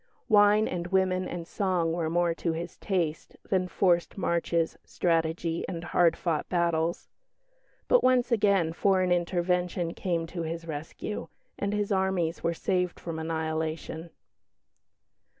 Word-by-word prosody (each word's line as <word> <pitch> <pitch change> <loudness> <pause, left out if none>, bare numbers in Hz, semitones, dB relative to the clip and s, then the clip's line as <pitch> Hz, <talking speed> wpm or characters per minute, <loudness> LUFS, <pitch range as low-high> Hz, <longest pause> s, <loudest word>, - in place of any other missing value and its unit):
Wine 210 -1 +5
and 175 -1 -3
women 185 0 +1
and 170 -1 -6
song 180 -5 0
were 165 -2 -1
more 175 0 +2
to 165 0 -2
his 170 +1 -5
taste 170 -5 -2
than 185 -2 +1
forced 175 0 +1
marches, 170 -2 0
strategy, 165 -1 0
and 170 -2 -5
hard 175 -1 +3
fought 165 -4 -1
battles. 170 -1 0 0.8
But - - +4
once 255 -1 +3
again 200 -7 +3
foreign 185 0 +2
intervention 175 0 0
came 170 -4 -1
to 170 +1 -5
his 165 +1 -4
rescue; 160 +6 -5 0.3
and 200 - -1
his 210 0 -1
armies 190 -4 0
were 170 0 0
saved 180 0 -1
from 165 -2 -5
annihilation. 160 0 -3
175 Hz, 130 wpm, -28 LUFS, 165-190 Hz, 0.8 s, Wine